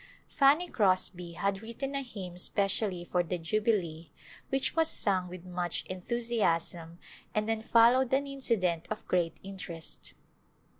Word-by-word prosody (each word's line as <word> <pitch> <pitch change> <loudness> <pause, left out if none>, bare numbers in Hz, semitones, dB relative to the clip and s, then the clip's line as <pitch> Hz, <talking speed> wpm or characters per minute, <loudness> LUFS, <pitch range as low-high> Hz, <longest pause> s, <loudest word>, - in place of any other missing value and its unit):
Fanny 295 +6 +4
Crosby 185 - +1
had 195 +4 -1
written 235 +5 -5
a 275 - -1
hymn 195 -9 -7
specially 190 0 +1
for 180 0 +1
the 175 +1 -3
Jubilee 170 -3 -1 0.4
which 270 +2 0
was 325 -1 +4
sung 190 - +2
with 180 0 -9
much 180 -1 -2
enthusiasm 180 -5 -1 0.4
and 215 0 +1
then 225 -1 0
followed 235 +3 +5
an 275 +2 +2
incident 210 -12 0
of 215 - -5
great 170 -3 +1
interest. 185 -4 -6
195 Hz, 135 wpm, -30 LUFS, 175-235 Hz, 0.4 s, followed